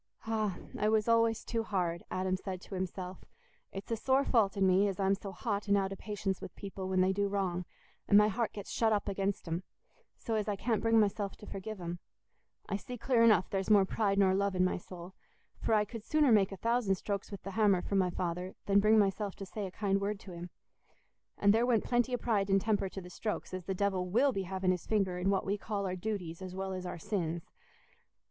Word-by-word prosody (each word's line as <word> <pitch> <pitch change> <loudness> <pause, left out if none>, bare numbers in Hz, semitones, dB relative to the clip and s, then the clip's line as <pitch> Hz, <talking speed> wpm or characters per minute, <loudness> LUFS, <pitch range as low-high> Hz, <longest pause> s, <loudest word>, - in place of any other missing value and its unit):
"Ah! 215 -4 -1 0.2
I 210 - +2
was 220 0 +2
always 230 -1 +3
too 230 -1 -1
hard," 180 -6 -1
Adam 185 0 0
said 185 -1 -5
to - - -11
himself. 185 0 -5 0.5
"It's 195 +4 -7
a - - +2
sore 265 +4 +2
fault 215 -4 +2
in 195 - +3
me 190 +2 +4
as 195 -1 -3
I'm 195 0 +3
so 200 0 -5
hot 200 +3 -3
and 200 0 +4
out 195 0 0
o' - - -6
patience 195 -2 -3
with - - -8
people 195 -2 -6
when 185 -1 +2
they 190 +1 +3
do 200 +1 +1
wrong, 185 -3 -1 0.4
and 205 - +6
my 210 0 +7
heart 225 +2 -1
gets 205 -2 -8
shut 225 -1 +2
up 210 -2 +1
against 195 -1 -2
'em, 165 +2 -2 0.6
so 230 - -4
as 215 -1 0
I 205 - 0
can't 225 +2 0
bring 225 0 +4
myself 200 -1 0
to - - -12
forgive 205 +1 -6
'em. 175 0 -5 0.7
I 200 - -1
see 245 +5 -8
clear 240 0 +2
enough 210 -6 +4
there's 195 +1 -1
more 205 -2 +6
pride 200 0 0
nor 190 -1 +4
love 200 0 +1
in 185 0 +3
my 185 - 0
soul, 175 +1 -10 0.5
for 220 - +2
I 210 0 +3
could 225 0 -8
sooner 300 0 +3
make 205 -3 +4
a 195 - -6
thousand 230 -1 +1
strokes 200 +1 -4
with 200 -2 -8
th' 195 - -5
hammer 200 -3 +3
for - - -5
my 190 -2 +3
father 180 +1 -3
than 200 0 +4
bring 215 +2 +5
myself 200 -1 +1
to 195 - -7
say 195 +2 -5
a - - -9
kind 195 0 0
word 200 0 -2
to 190 - -10
him. 175 0 -7 0.9
And 200 0 +5
there 230 +2 +3
went 235 -3 +3
plenty 245 +1 +1
o' - - -2
pride 210 -5 0
and 195 0 +4
temper 205 -1 0
to 195 - -7
the 180 0 -11
strokes, 210 0 -4
as 185 -2 -5
the 190 - -2
devil 185 -2 0
will 255 +9 +4
be 195 -5 -3
having 190 -1 +1
his 180 -2 -3
finger 195 -4 +1
in 185 +2 +1
what 195 -1 +1
we 200 +1 -1
call 200 -1 -3
our 185 -1 -2
duties 185 -3 -4
as 185 -1 -7
well 190 0 -3
as 185 -1 -5
our 180 - -5
sins. 170 -3 -2
195 Hz, 240 wpm, -32 LUFS, 185-215 Hz, 0.9 s, my